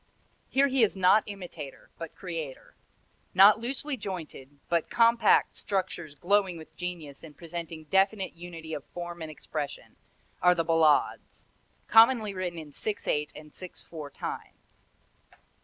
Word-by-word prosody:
Here 275 +1 +4
he 265 -1 +1
is 210 - +2
not 190 +3 +5
imitator, 175 -8 -8
but 165 -2 -7
creator. 165 -7 -6 0.6
Not 200 +3 +8
loosely 270 +4 -2
jointed, 160 - -7
but 170 -2 0
compact 235 0 +4
structures 175 -6 -3
glowing 190 +2 +2
with 160 - -13
genius 170 -6 -6
and 155 -3 -13
presenting 165 -1 -7
definite 195 +4 +2
unity 165 -2 -8
of 145 - -4
form 175 -1 -7
and 160 - -5
expression, 150 0 -6 0.4
are 180 0 +6
the 165 -1 0
ballades 160 -3 +2 0.4
commonly 225 -2 +6
written 180 -2 -3
in 155 -2 -8
six 210 +8 -3
eight 150 0 0
and 150 -1 -12
six 185 -1 -8
four 155 -4 -8
time. - - -6
175 Hz, 140 wpm, -28 LUFS, 155-200 Hz, 0.6 s, Not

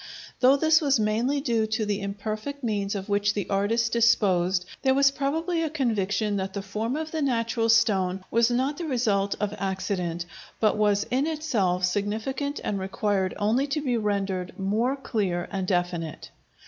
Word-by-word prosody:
Though 260 +2 +6
this 315 +2 +4
was 275 -5 +2
mainly 230 +7 +1
due 230 -5 +1
to 220 0 -1
the 205 -1 -1
imperfect 215 +7 -5
means 205 -3 -1
of 195 -1 -4
which 205 0 +1
the 205 - -2
artist 225 +4 +1
disposed, 190 -6 +3 0.2
there 265 -1 +3
was 275 0 +5
probably 320 +5 -1
a 320 - 0
conviction 215 -7 0
that 190 0 -3
the 200 - -4
form 215 +5 -3
of 315 0 -4
the 315 - -2
natural 230 -3 0
stone 195 -5 +3
was 230 +1 +4
not 260 +4 0
the 345 - -3
result 215 -8 +1
of 210 -1 -1
accident, 185 -3 -2 0.3
but 215 - +3
was 205 -1 +2
in 265 +4 +1
itself 220 - 0
significant 220 +9 -2
and 200 - -2
required 190 0 -1
only 225 +7 +1
to 290 +2 -1
be 260 -5 -1
rendered 195 -4 -2
more 220 +7 0
clear 200 -10 -2
and 190 -2 -2
definite. 175 -4 -2
215 Hz, 170 wpm, -26 LUFS, 195-260 Hz, 0.3 s, Though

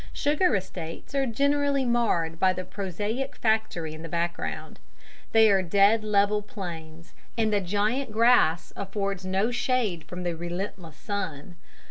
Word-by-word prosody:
Sugar 295 - +2
estates 180 - -6
are 275 -1 +1
generally 280 +2 +1
marred 175 -9 +1
by 185 0 +4
the 185 - -5
prosaic 205 +7 -3
factory 220 -8 0
in 155 - -9
the 165 - -7
background. 170 +1 -3 0.5
They 225 0 +6
are 195 -1 +4
dead 200 +5 +4
level 210 0 +2
plains, 170 -5 -8 0.2
and 220 -2 +1
the 205 - +2
giant 210 +7 0
grass 220 -7 +3
affords 195 -1 -3
no 195 +5 +1
shade 245 -8 0
from 180 +3 -7
the 175 -1 -2
relentless 175 -1 -6
sun. 180 -5 -5
200 Hz, 140 wpm, -26 LUFS, 175-225 Hz, 0.5 s, They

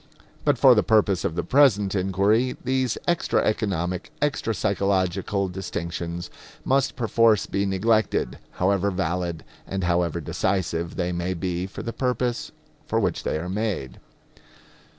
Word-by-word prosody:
But - - +2
for - - +7
the - - +4
purpose 105 -4 +2
of 90 -5 -1
the 85 - -1
present 110 -9 +4
inquiry 100 +6 +1
these 130 -2 0
extra 175 -1 +1
economic, 90 -5 -1
extra 145 -5 0
psychological 100 0 0
distinctions 85 -2 -5 0.3
must 135 0 +2
perforce 115 -3 +3
be 100 0 -1
neglected, 105 - +1
however 100 +1 +1
valid 90 -3 -2 0.2
and 95 -1 -3
however 85 -1 +1
decisive 85 +1 -1
they 90 -1 -1
may 90 +1 -2
be 90 +1 -2
for 95 - -8
the 115 - -4
purpose 125 -2 -1 0.4
for - - +1
which - - 0
they - - -1
are 85 +3 -4
made. 95 - -3
95 Hz, 135 wpm, -24 LUFS, 90-110 Hz, 0.4 s, for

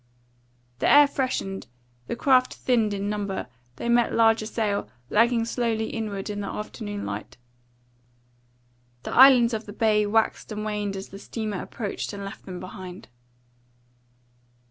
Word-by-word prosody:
The - - +2
air 290 0 +8
freshened; 255 - -2 0.4
the - - -2
craft 255 0 +3
thinned 230 -4 +1
in 200 0 -2
number; 205 -5 -2 0.3
they 185 - -5
met 235 0 +3
larger 225 -1 +4
sail, 210 -3 -1 0.2
lagging 230 +1 +3
slowly 230 -2 -1
inward 210 -4 -4
in 205 -1 -4
the 200 - -4
afternoon 205 -1 -5
light; - - -6 1.7
the - - -5
islands 250 -3 +7
of 220 0 -4
the 205 - -8
bay 210 -1 +2
waxed 220 +1 0
and 215 0 -4
waned 210 -2 -2
as 195 0 -7
the 195 - -10
steamer 215 -3 -4
approached 210 -1 -5
and 200 -1 -6
left 195 - -9
them 180 -1 -6
behind. 185 -2 -9
215 Hz, 145 wpm, -25 LUFS, 200-230 Hz, 1.7 s, air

